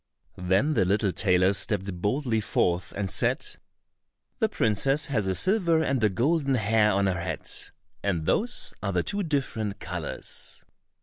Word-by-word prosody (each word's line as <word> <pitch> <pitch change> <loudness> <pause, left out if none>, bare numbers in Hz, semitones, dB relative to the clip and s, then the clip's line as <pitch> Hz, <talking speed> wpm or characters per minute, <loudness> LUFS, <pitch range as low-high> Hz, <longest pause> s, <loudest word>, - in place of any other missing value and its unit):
Then 95 +12 +2
the 105 - +3
little 100 +2 +1
tailor 90 0 +3
stepped 95 -3 -1
boldly 115 +2 0
forth 90 -2 0
and 100 0 -2
said, - - +1 0.9
"The - - +2
princess 135 +8 +1
has 110 -9 -1
a 95 - 0
silver 170 - +2
and 135 -6 0
a 110 - +5
golden 140 - +1
hair 110 -1 +3
on 100 0 +1
her 90 -3 0
head, 85 -3 -5 0.5
and 85 -6 -1
those 240 - +1
are 100 -1 -2
the 90 -1 +1
two 205 - -2
different 125 - -2
colors." 90 -4 -7
105 Hz, 150 wpm, -26 LUFS, 95-135 Hz, 0.9 s, a